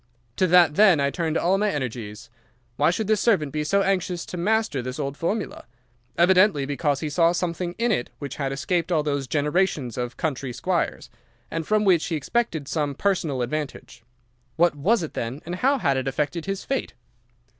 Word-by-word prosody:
To 185 - +3
that 175 -3 +6
then 195 -7 +6
I 140 0 +1
turned 165 -1 -1
all 190 +3 +2
my 210 0 +2
energies. 115 - -5 0.4
Why 145 +5 +3
should 195 +6 -1
this 215 0 +1
servant 170 -12 +2
be 150 +1 -2
so 200 +6 +2
anxious 185 -2 -1
to - - -7
master 210 - 0
this 125 +1 -5
old 140 -2 -3
formula? 195 - -3 0.5
Evidently 180 -4 +4
because 145 0 -1
he 155 - -2
saw 165 +2 +3
something 175 0 -2
in 235 +1 +1
it 150 - -1
which 140 +1 -7
had 135 -2 -2
escaped 170 +5 -1
all 155 -3 +2
those 140 -2 -2
generations 150 - 0
of 125 0 -4
country 135 -5 -3
squires, 180 +6 -2 0.4
and 165 -1 -3
from 215 0 +2
which 180 -5 +3
he 165 - -1
expected 160 - -1
some 145 -1 -1
personal 160 -9 0
advantage. 145 -1 -5 0.5
What 170 +2 +3
was 190 +8 +2
it 160 - -6
then, 120 +5 -4
and 175 +2 -4
how 275 +7 +2
had 140 - +1
it 130 0 -2
affected 150 +5 -2
his 195 -1 -3
fate? 270 - -3
160 Hz, 190 wpm, -24 LUFS, 140-185 Hz, 0.5 s, that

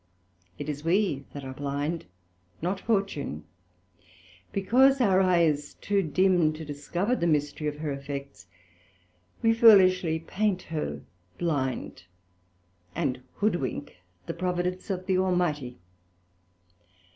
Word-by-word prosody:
It 145 - -6
is 150 0 -4
we 165 -5 +1
that 145 - -8
are 130 0 -6
blind, 145 +4 -3 0.5
not 185 +4 -2
Fortune: 195 - -1 1.1
because 260 +8 +4
our 195 -6 +4
Eye 180 -2 +4
is 150 -2 0
too 200 -1 0
dim 175 -1 +3
to 155 +1 -8
discover 170 - -1
the 170 - 0
mystery 150 -1 0
of 150 0 -3
her 150 -1 -3
effects, 140 -7 -7 1.0
we 225 0 +5
foolishly 185 -7 +6
paint 185 +3 -1
her 150 - -4 0.3
blind, 130 - -2 0.9
and 140 -6 -1
hoodwink 175 - -2 0.3
the - - -4
Providence 180 +1 -2
of 185 -1 -3
the 185 -1 +2
Almighty. 175 -9 0
170 Hz, 115 wpm, -27 LUFS, 145-190 Hz, 1.1 s, foolishly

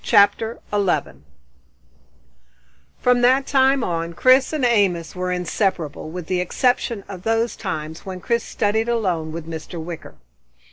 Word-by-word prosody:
CHAPTER 220 +3 +3 0.2
11 175 - 0 1.7
From 250 -1 +3
that 260 +2 +4
time 270 -1 +3
on 170 -2 -2
Chris 255 +8 +4
and 300 -5 0
Amos 190 -9 +1
were 180 0 -2
inseparable, 180 -4 -2
with 175 +1 -6
the 180 +2 0
exception 235 +2 0
of 185 -3 -8
those 225 +3 0
times 160 -6 -5
when 185 -1 -6
Chris 235 +5 0
studied 220 +2 0
alone 180 -9 0
with 165 0 -6
Mr. 165 +1 -7
Wicker. 165 0 -8
195 Hz, 135 wpm, -21 LUFS, 170-235 Hz, 1.7 s, that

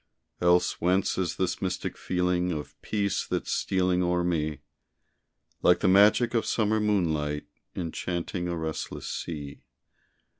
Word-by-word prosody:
Else 90 0 +3
whence 90 +3 +2
is 90 -3 -1
this 95 -1 -1
mystic 90 -1 -2
feeling 90 0 0
Of 75 -3 -5
peace 100 -2 -1
that's - - -2
stealing 90 -1 +1
o'er 90 0 +1
me? 80 -4 -1 1.0
Like 90 - +4
the - - +3
magic 105 +5 +5
of 115 - +2
summer 110 -1 +1
moonlight 80 -8 0 0.3
Enchanting 90 +1 -3
a 85 -1 -2
restless 80 -1 -4
sea. 75 -4 -5
90 Hz, 125 wpm, -27 LUFS, 85-95 Hz, 1.0 s, magic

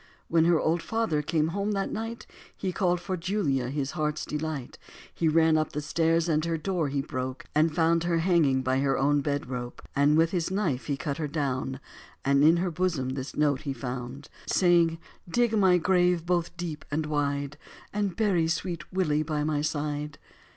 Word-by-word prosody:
When 165 -1 +4
her 170 -2 +4
old 165 +2 +1
father 225 -10 0
came 155 +1 0
home 200 +4 -1
that 195 -1 -1
night 225 +1 -5 0.3
He 190 - -2
called 180 -1 +1
for 185 +2 -3
Julia, 165 -9 -1
his 140 0 -2
heart's 155 -2 -2
delight, 150 -3 -4 0.3
He 165 - 0
ran 160 0 +4
up 155 -1 -2
stairs 165 +2 +1
and 155 -2 +1
her 165 0 -1
door 165 -1 -1
he 140 0 -1
broke 130 -2 -5
And 155 +1 +2
found 165 0 +2
her 170 -1 +1
hanging 165 -7 +3
by 130 +1 +1
her 135 0 +1
own 145 +1 +2
bed 145 0 -2
rope. 125 -1 -5 0.2
And 145 +2 +4
with 165 +1 +3
his 175 -2 -1
knife 185 -10 -1
he 140 -2 -1
cut 140 +1 -3
her 155 -2 -2
down, 135 -3 -2 0.5
And 140 +1 +4
in 160 +3 +6
her 180 +1 0
bosom 165 -6 -1
this 130 +1 -5
note 145 -2 +2
he 140 -3 -3
found 125 +2 -6 0.2
Saying, 170 -2 +3 0.3
"Dig 235 +3 +2
my 190 -4 +5
grave 180 -1 +2
both 175 -1 -1
deep 165 -3 -5
and 155 +1 -1
wide 145 -1 -2 0.3
And 200 -3 -1
bury 185 -6 +2
sweet 165 0 -3
Willie 155 -5 +1
by 150 -1 -1
my 150 -1 0
side." 150 -1 -3
155 Hz, 185 wpm, -27 LUFS, 145-175 Hz, 0.5 s, in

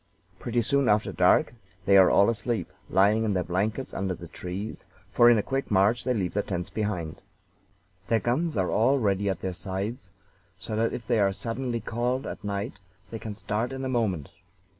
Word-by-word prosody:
Pretty 120 0 0
soon 140 +1 +2
after 105 0 +2
dark - - +3 0.3
they 100 -1 +5
are 95 -2 +8
all 100 - +5
asleep, 115 +1 -3 0.2
lying 105 +3 +3
in 105 -2 0
their 90 - +1
blankets 100 +9 -2
under 95 -1 -2
the 85 - -10
trees, 90 +5 -6 0.2
for 120 0 +6
in 120 - +6
a 105 - +1
quick 135 +5 -2
march 105 +4 +3
they 125 - +1
leave 95 -5 -1
their 105 - +1
tents 90 -3 -4
behind. 95 -7 -3 0.9
Their 115 - +2
guns 150 +6 -1
are 95 -2 +1
all 130 +6 +3
ready 100 -4 +1
at 95 - -3
their 95 -1 -3
sides, 95 +3 -4 0.5
so 105 +3 -5
that 115 +1 +1
if 115 - -6
they 115 -2 +1
are 100 -1 +3
suddenly 120 +2 -3
called 120 +4 -2
at - - -7
night 100 0 -4 0.3
they 115 - -5
can 110 -2 -6
start 110 +3 -2
in 135 0 -4
a - - -2
moment. 105 - -1
105 Hz, 195 wpm, -27 LUFS, 95-120 Hz, 0.9 s, are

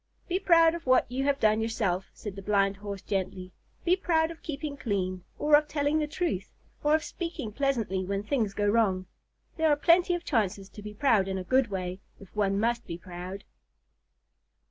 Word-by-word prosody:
"Be 365 +1 0
proud 330 -4 +5
of 340 -4 -7
what 255 0 +5
you 265 +2 -1
have 280 -1 +1
done 215 -1 +3
yourself," 200 -5 -1
said 205 -4 -8
the 195 - -7
Blind 195 0 +1
Horse 200 -1 -7
gently. 185 -2 -3 0.3
"Be 355 +1 +5
proud 330 -4 +1
of 330 - -11
keeping 295 -1 -4
clean, 185 -7 -2
or 300 0 +5
of 300 0 +3
telling 290 +1 +1
the 300 - 0
truth, 295 - -2 0.3
or 295 +1 +4
of 315 - 0
speaking 335 - -5
pleasantly 225 -7 0
when 195 +2 -2
things 215 -3 -1
go 205 - 0
wrong. 205 -4 +2 0.5
There 320 -1 +3
are 295 - +5
plenty 350 +4 +4
of 350 - -6
chances 200 -6 0
to 210 - -11
be 210 0 -8
proud 215 -6 +3
in 190 0 -2
a 185 - -3
good 260 +6 +3
way, 185 -2 -4 0.2
if 195 0 -15
one 200 -1 +1
must 235 +2 0
be 170 - -5
proud." 180 +2 -8
220 Hz, 195 wpm, -28 LUFS, 195-295 Hz, 0.5 s, proud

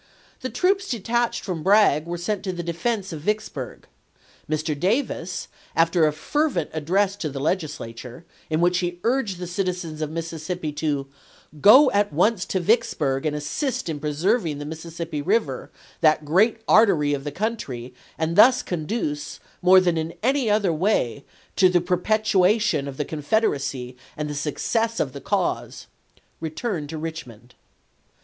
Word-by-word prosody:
The 255 - -4
troops 390 +5 +1
detached 235 +1 -1
from 180 -5 -4
Bragg 190 -5 +4
were 175 0 -3
sent 185 +4 -2
to 190 - -1
the 175 -1 -5
defense 190 +3 -2
of 155 - -6
Vicksburg. 215 +5 -3 0.6
Mr. 155 0 -1
Davis, 185 - -1 0.3
after 165 -1 +4
a - - +2
fervent 185 - -1
address 185 +6 +1
to 160 -6 -3
the 135 -1 -6
Legislature, 145 -4 -4 0.2
in 155 +1 0
which 175 +1 +3
he 175 -1 -3
urged 230 -6 0
the 180 - -5
citizens 180 -3 -3
of 155 - -1
Mississippi 165 0 -4
to 145 -2 -2 0.6
"go 260 +7 +8
at 205 -2 +2
once 185 +6 +2
to 190 - -1
Vicksburg 160 - +1
and 150 - -1
assist 195 - -2
in 155 -2 -3
preserving 155 +3 0
the 145 - -6
Mississippi 160 0 -5
River, 145 - 0 0.3
that 155 -1 +3
great 210 +9 +3
artery 175 -10 +4
of 140 -1 -3
the 145 - -4
country, 145 - -4 0.2
and 160 +1 -1
thus 250 +5 +6
conduce, 155 -3 -3 0.2
more 185 +1 +7
than 175 -3 +1
in 160 +1 -4
any 265 -1 +2
other 205 -4 +2
way, 155 - 0 0.3
to 185 -2 +6
the 180 -1 +3
perpetuation 190 -2 +2
of 135 -1 -7
the 150 - -1
Confederacy 140 - -1 0.2
and 150 0 -2
the 150 - -4
success 225 - -1
of - - -1
the - - -8
cause," - - -2 0.5
returned 160 -1 -4
to 160 - -5
Richmond. 125 -7 -8
170 Hz, 155 wpm, -24 LUFS, 150-210 Hz, 0.6 s, go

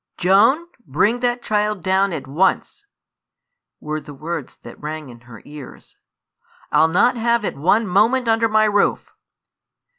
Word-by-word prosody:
"Joan, 205 - +3 0.2
bring 205 - +1
that 245 0 -1
child 210 -3 -1
down 190 +1 +1
at 155 -6 -5
once!" 190 - -1 0.9
were 155 0 -5
the 145 - -12
words 155 0 -6
that 120 - -12
rang 155 -1 -6
in 120 -1 -13
her 120 0 -15
ears; 145 -2 -13 0.7
"I'll 155 +2 +4
not 210 +9 +2
have 235 -1 0
it - - -3
one 190 +10 +1
moment 225 +7 +2
under 225 0 +2
my 215 0 +3
roof." 205 -1 0
190 Hz, 145 wpm, -20 LUFS, 150-225 Hz, 0.9 s, I'll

